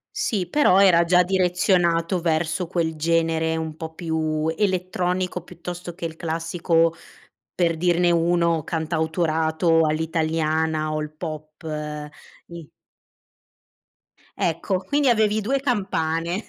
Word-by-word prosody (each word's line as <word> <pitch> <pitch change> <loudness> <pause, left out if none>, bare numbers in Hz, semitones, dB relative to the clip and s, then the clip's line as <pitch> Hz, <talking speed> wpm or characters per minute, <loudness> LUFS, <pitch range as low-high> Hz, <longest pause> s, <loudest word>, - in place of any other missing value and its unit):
Sì, 210 - -1
però 195 -7 +4
era 170 -4 +5
già 180 +1 +4
direzionato 180 -1 +1
verso 165 +1 0
quel 165 -2 -1
genere 160 0 +1
un 160 -1 -4
po' 160 0 -8
più 160 -2 -1
elettronico, 180 -2 -1
piuttosto 175 0 -8
che 175 - -6
il 160 0 -6
classico, 165 0 0 0.6
per 170 -2 +1
dirne 175 +1 +2
uno, 170 -1 +2
cantautorato 160 0 +1
all'italiana 160 0 0
o 155 - -1
il 150 0 -7
pop. 155 0 -8 0.8
I 170 -3 -11 1.7
Ecco. 170 +3 -1
Quindi 285 +5 +1
avevi 215 -2 +2
2 270 +6 0
campane. 175 - -1
170 Hz, 110 wpm, -23 LUFS, 160-180 Hz, 1.7 s, era